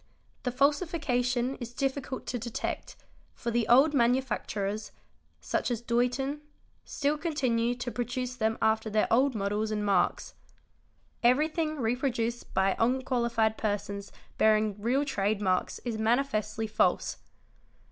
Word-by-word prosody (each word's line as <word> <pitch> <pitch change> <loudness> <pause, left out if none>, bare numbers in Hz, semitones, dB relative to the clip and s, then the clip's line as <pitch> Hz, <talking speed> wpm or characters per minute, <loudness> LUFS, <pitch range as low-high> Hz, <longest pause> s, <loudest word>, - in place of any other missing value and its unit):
The 250 - -1
falsification 265 -3 +1
is 240 -1 -8
difficult 270 0 -2
to 245 - -3
detect, 235 0 -4 0.4
for 235 - -3
the 235 -1 +1
old 275 +5 +6
manufacturers 235 -5 0 0.5
(such - - -1
as 240 -3 -1
Doulton) 250 +5 0 0.4
still 290 +1 -1
continue 250 -7 0
to 245 0 -4
produce 245 +1 -3
them 220 -2 0
after 220 0 +2
their 215 0 +2
old 260 +2 +3
models 210 +1 -1
and 210 -1 -1
marks. 195 -3 +1 0.9
Everything 310 +6 +2
re 240 -4 0
_ - - -14
produced 240 -3 -2
by 190 0 +3
unqualified 235 -3 +1
persons 200 -1 -3 0.3
bearing 215 -1 +3
real 260 +6 +1
trade 205 -5 0
marks 185 -3 0
is 230 -3 -2
manifestly 220 -2 0
false. 215 0 +1
240 Hz, 125 wpm, -29 LUFS, 220-265 Hz, 0.9 s, old